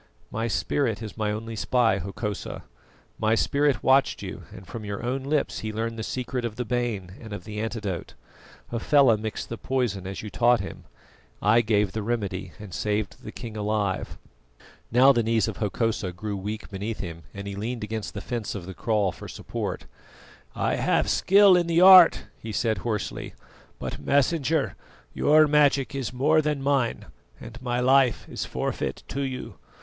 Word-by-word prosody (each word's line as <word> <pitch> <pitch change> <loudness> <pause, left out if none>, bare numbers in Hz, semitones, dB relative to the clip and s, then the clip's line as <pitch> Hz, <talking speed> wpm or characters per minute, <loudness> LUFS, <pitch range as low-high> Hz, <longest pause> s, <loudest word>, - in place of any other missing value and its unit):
"My 115 +1 -1
spirit 115 +1 0
is 110 - -7
my 110 -1 -1
only 115 +2 -5
spy, 115 -3 +2
Hokosa. 100 +3 -5 0.6
My 110 +1 +3
spirit 140 +3 +1
watched 135 +1 +3
you, - - -7
and 95 - -11
from 110 +4 -7
your 100 +1 -5
own 130 +2 -1
lips 145 +2 -1
he 110 - -4
learned 115 +1 -3
the - - -2
secret 125 +2 -3
of 115 -2 -3
the 125 - -3
bane 115 -6 -2
and 110 -2 -10
of 100 - -6
the 105 +1 -6
antidote. 105 -5 -4 0.6
Hafela 120 +1 +4
mixed 110 0 -5
the 115 - -5
poison 115 -8 -1
as 95 +2 -6
you 105 - -6
taught 120 -1 +4
him; - - -7 0.5
I 110 +3 +4
gave 105 -3 +1
the 110 - -3
remedy, 100 -5 -3
and 105 -4 -10
saved 105 0 -2
the - - -7
king 115 -2 -8
alive." 105 -2 -1 0.7
Now 130 +4 +7
the 120 -3 +2
knees 110 -2 +1
of - - -4
Hokosa 105 -2 -1
grew 105 +3 -5
weak 105 +3 -5
beneath 105 +3 -4
him, 85 -3 -6
and 100 0 -8
he 100 - -4
leaned 115 +4 -4
against 110 -1 -4
the 100 - -4
fence 120 -3 -4
of 95 -4 -6
the 95 - -7
kraal 105 +1 +1
for - - -10
support. - - -5 0.7
"I - - 0
have - - +2
skill 200 -1 +6
in 175 -1 +2
the 170 +1 +3
art," 185 -2 +9 0.2
he 110 - -6
said 110 -1 0
hoarsely; 105 -2 -4 0.4
"but, - - -5
Messenger, 150 +2 +1 0.4
your 155 +1 +5
magic 145 -2 +3
is 135 -3 -3
more 150 +5 +3
than 150 -1 -1
mine, 135 -3 0 0.3
and 120 +2 -10
my 125 -1 -1
life 130 -1 +3
is - - -4
forfeit - - -3
to 140 - -3
you. 130 -2 -5
115 Hz, 175 wpm, -26 LUFS, 105-130 Hz, 0.7 s, art